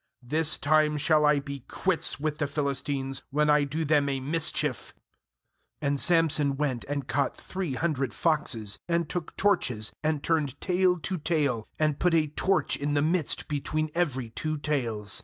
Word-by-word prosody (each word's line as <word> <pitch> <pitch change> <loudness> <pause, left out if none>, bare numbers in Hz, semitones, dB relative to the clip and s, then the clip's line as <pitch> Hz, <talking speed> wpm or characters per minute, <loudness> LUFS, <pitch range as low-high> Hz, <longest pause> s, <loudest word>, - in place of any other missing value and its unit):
'This 155 +5 +2
time 150 0 +2
shall 150 +1 +3
I 150 -1 +4
be 140 0 -7
quits 185 -6 +1
with 150 0 -2
the 145 - 0
Philistines, 140 -2 -2
when 150 +2 +2
I 150 -1 +4
do 155 +3 -3
them 145 -1 +2
a 135 -1 -1
mis 150 +5 +2
chief.' - - -2 0.8
4And 140 -1 0
Samson 155 -5 +3
went 135 -5 -1
and 140 -2 -4
caught 140 +1 0
three 185 -8 -5
hundred 140 -4 -1
foxes, 115 -11 0
and 170 -1 0
took 170 0 -5
torches, 125 - +1
and 155 -2 -1
turned 150 -5 0
tail 180 -1 +2
to 185 +1 -3
tail, 145 -8 0
and 155 -2 0
put 175 -1 +2
a 160 -2 +3
torch 185 +6 0
in 145 +1 -2
the 145 - +2
midst 165 -1 +1
between 155 +1 -2
every 135 -9 -1
two 155 +6 -3
tails. 115 -9 0
150 Hz, 170 wpm, -27 LUFS, 140-160 Hz, 0.8 s, I